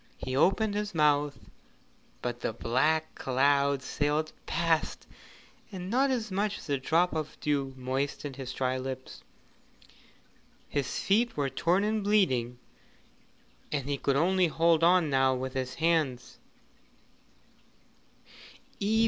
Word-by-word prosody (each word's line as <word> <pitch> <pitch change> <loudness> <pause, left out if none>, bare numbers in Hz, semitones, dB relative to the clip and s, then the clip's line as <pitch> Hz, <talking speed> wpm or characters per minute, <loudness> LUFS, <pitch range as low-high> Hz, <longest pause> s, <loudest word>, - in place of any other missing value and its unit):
He 130 - -4
opened 200 +8 +3
his 210 -2 -3
mouth, 145 -2 +2 0.9
but 120 -1 -3
the 115 - -2
black 155 +8 0
cloud 140 +1 +1
sailed 150 +3 -1
past 165 -1 0 0.7
and 185 -1 -6
not 270 +3 +3
as 235 -5 -2
much 200 +2 -1
as - - -11
a 140 -1 +1
drop 165 +6 +2
of 155 -2 -4
dew 140 -3 -1
moistened 135 +2 -3
his 130 -2 -6
dry 130 0 -1
lips. 130 0 -7 1.5
His 140 -4 -2
feet 225 +2 +1
were 140 -2 0
torn 175 +8 +1
and 215 0 0
bleeding, 130 - +2 1.1
and 140 -3 -2
he 140 -1 -1
could 140 - +1
only 180 +4 +3
hold 165 0 +2
on 175 -3 +4
now 130 -1 +3
with 130 0 -4
his 130 -1 -3
hands. 160 -7 0
150 Hz, 125 wpm, -29 LUFS, 130-180 Hz, 1.5 s, on